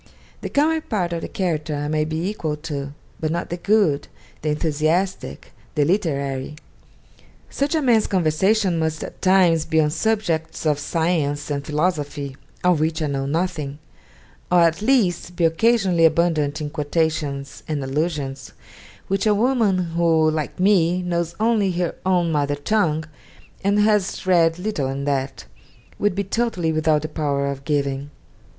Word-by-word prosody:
The - - -4
comic 315 +2 +1
part 180 -6 -1
of 165 - -3
the - - -4
character 160 -5 -2
I 145 0 -3
might 155 0 0
be 160 +3 -2
equal 165 -7 -2
to, 145 -3 -5 0.3
but 155 - -1
not 170 +1 -3
the 175 - -2
good, 175 -7 +2 0.3
the 155 - -1
enthusiastic, 160 +5 -1 0.2
the 145 -2 +3
literary. 140 -6 -1 1.0
Such 285 +3 0
a 310 - +1
man's 230 -4 +3
conversation 185 +2 +2
must 160 -1 -1
at - - -9
times 180 -4 +4
be 160 - +1
on 150 -1 +2
subjects 165 -5 -1
of 150 -2 +2
science 150 -2 -1
and 140 -1 -2
philosophy, 150 -3 -2 0.3
of 180 -3 +3
which 160 +1 0
I 155 - 0
know 135 -2 -2
nothing; 155 -3 -2 0.7
or 180 -1 +5
at 165 +2 +3
least 205 -8 +1
be 170 - +2
occasionally 185 0 +3
abundant 160 -3 +2
in 150 -1 -4
quotations 150 -2 -2
and 150 -3 -2
allusions 140 -1 -3 0.5
which 195 +2 0
a 210 - +4
woman 225 -4 +2 0.2
who, 165 -2 +3
like 155 +1 -4
me, 180 -2 +3
knows 170 -1 -2
only 215 -4 +2
her 175 -1 -1
own 175 -3 +2
mother 145 -1 0
tongue, 160 0 0 0.6
and 200 +1 +2
has 210 -3 +1
read 170 -3 +3
little 180 -8 -2
in 135 +1 -3
that, 135 -1 -2 0.5
would 205 -3 +1
be 200 - 0
totally 195 -5 -1
without 155 -1 +1
the - - -2
power 145 -3 -1
of 140 0 -8
giving. 140 -1 -1
165 Hz, 155 wpm, -22 LUFS, 150-185 Hz, 1.0 s, or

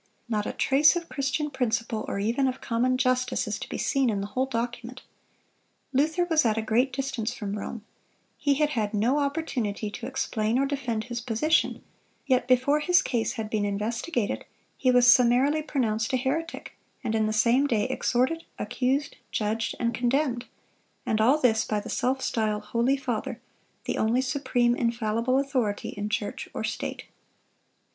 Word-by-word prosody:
Not 210 -3 -1
a - - -1
trace 285 +4 +4
of 340 -1 -4
Christian 280 +2 -1
principle, 230 -4 -1
or - - -3
even 230 +7 +1
of 260 0 -2
common 250 +2 +1
justice, 255 0 +1
is - - -3
to - - -7
be - - -4
seen 270 -3 +1
in 205 -3 0
the 195 - -3
whole 260 +3 +1
document. 245 0 -4 0.9
Luther 315 +6 +2
was 325 -3 +3
at 225 -2 +1
a - - +1
great 240 +5 +2
distance 255 -3 -3
from 205 -2 -4
Rome; 210 +1 -6 0.5
he 285 -1 +1
had 300 +1 +1
had 215 -4 -1
no 240 +8 +2
opportunity 260 -8 -2
to 235 +3 -6
explain 230 -3 -1
or 275 - +2
defend 250 -6 -2
his 240 0 -5
position; 250 +7 +1 0.4
yet 255 -3 +2
before 260 +4 +3
his 360 +4 +4
case 235 -3 -1
had 220 -1 -4
been 215 -1 -1
investigated, 215 +5 -2 0.3
he 255 - +1
was 250 -1 +5
summarily 250 +5 +5
pronounced 225 -7 -1
a - - +4
heretic, 305 +6 -3 0.3
and 225 -3 -1
in 220 -1 +2
the - - 0
same 235 +6 +3
day, 225 -6 +1
exhorted, 260 +5 0
accused, 255 +6 -1
judged, 215 +1 -1
and 235 -1 0
condemned; 245 +1 0 0.6
and 215 0 +1
all 255 +7 +5
this 225 -5 +3
by 210 - -1
the - - -8
self 260 +2 0
styled 215 -2 -1
holy 235 +5 +1
father, 245 -3 -3 0.5
the - - -2
only 225 +3 +2
supreme, 255 -2 +1
infallible 230 +1 0
authority 255 -7 -1
in 205 +1 -4
church 210 -1 -3
or - - -3
state! - - -4
245 Hz, 170 wpm, -27 LUFS, 220-270 Hz, 0.9 s, was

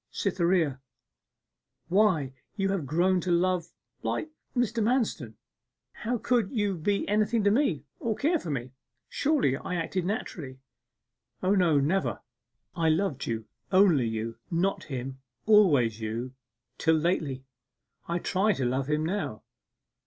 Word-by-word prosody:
'Cytherea! 170 -7 +1 1.1
Why, 180 -9 +2 0.2
you 195 -2 0
had 190 -8 -1
grown 180 +5 +2
to 180 - -4
love 180 0 +1 0.3
like 315 - -2 0.3
Mr. 235 -1 +1
Manston, 230 - +1
and 110 - -18 0.6
how 240 +3 -2
could 235 -3 +1
you 205 -5 0
be 200 +5 0
anything 215 +2 +2
to 205 - +4
me 215 - +1 0.2
or 225 -2 -1
care 320 +7 +1
for 170 - -7
me? 130 -3 -3 0.4
Surely 280 - +2
I 180 - -4
acted 175 +2 -1
naturally?' 160 -9 -4 0.9
'O 185 +2 +3
no 170 -7 +4
never! 170 +8 0 0.6
I 165 -2 +2
loved 160 -2 0
you 110 -1 -2 0.3
only 185 - +5
you 110 +1 -3
not 190 +3 0
him 130 -1 -5 0.3
always 145 - +5
you! 115 +4 -4 0.5
till 160 0 +4
lately.... 155 -5 -1 0.6
I 170 - 0
try 195 +4 +1
to 135 - -2
love 130 +2 0
him 150 +1 +1
now. 155 - -3
175 Hz, 140 wpm, -28 LUFS, 135-205 Hz, 1.1 s, only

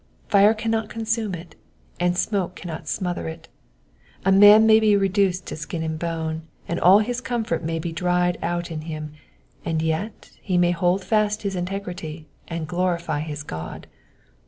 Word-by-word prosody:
Fire 205 +1 +5
cannot 225 0 -1
consume 225 -3 -2
it, 165 -1 -11 0.4
and 175 0 +1
smoke 190 -3 -1
cannot 170 -3 -7
smother 180 -4 -2
it. 160 0 -8 0.8
A 195 - +4
man 205 +3 +8
may 220 0 +7
be 215 -2 +4
reduced 195 -1 +1
to - - -5
skin 160 +1 -5
and 160 -1 -3
bone, 160 -1 -3 0.3
and 170 - -2
all 185 +3 +7
his 245 +1 -3
comfort 230 -9 -2
may 165 +1 -2
be 165 +1 -3
dried 180 +1 0
out 175 0 -2
of 155 -1 -4
him, 155 -1 -6 0.5
and 160 -1 -1
yet 160 +7 -3
he 185 -3 0
may 175 0 +4
hold 175 +2 +1
fast 210 +2 +1
his 195 -1 -2
integrity 180 -4 -5 0.2
and 165 -2 -4
glorify 170 -3 -1
his 150 -1 -5
God. 80 - -7
180 Hz, 165 wpm, -23 LUFS, 160-200 Hz, 0.8 s, man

